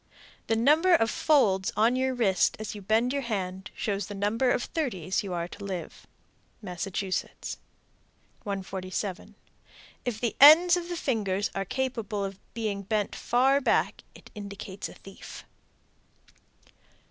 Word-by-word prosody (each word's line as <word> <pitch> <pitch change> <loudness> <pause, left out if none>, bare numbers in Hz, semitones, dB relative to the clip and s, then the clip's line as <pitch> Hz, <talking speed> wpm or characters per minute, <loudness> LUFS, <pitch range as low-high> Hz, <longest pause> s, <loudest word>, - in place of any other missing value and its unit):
The 225 - +2
number 310 +10 +5
of 225 -7 +2
folds 200 -11 +3
on 225 +4 +4
your 260 0 0
wrist 200 -6 +2
as 215 -1 -5
you 205 - -8
bend 225 +6 +1
your 280 - -1
hand 190 -5 -4
shows 200 -2 -2
the 205 - -7
number 210 +6 +1
of 245 - +1
thirties 195 - -2
you 195 - -6
are 170 -1 -2
to 200 - -10
live. 190 -3 -6 0.5
Massachusetts. 190 0 -4 0.8
147. 190 -1 -5 0.7
If 240 -4 -3
the 235 -1 -1
ends 335 +5 +9
of 350 -1 -4
the 350 - -3
fingers 205 -8 -1
are 195 0 -2
capable 225 -4 -2
of 195 0 -7 0.2
being 215 -3 -2
bent 205 +1 -1
far 265 +3 +2
back, - - +1
it - - -15
indicates 200 -1 -7
a - - -13
thief. 195 0 -11
210 Hz, 140 wpm, -28 LUFS, 195-250 Hz, 0.8 s, ends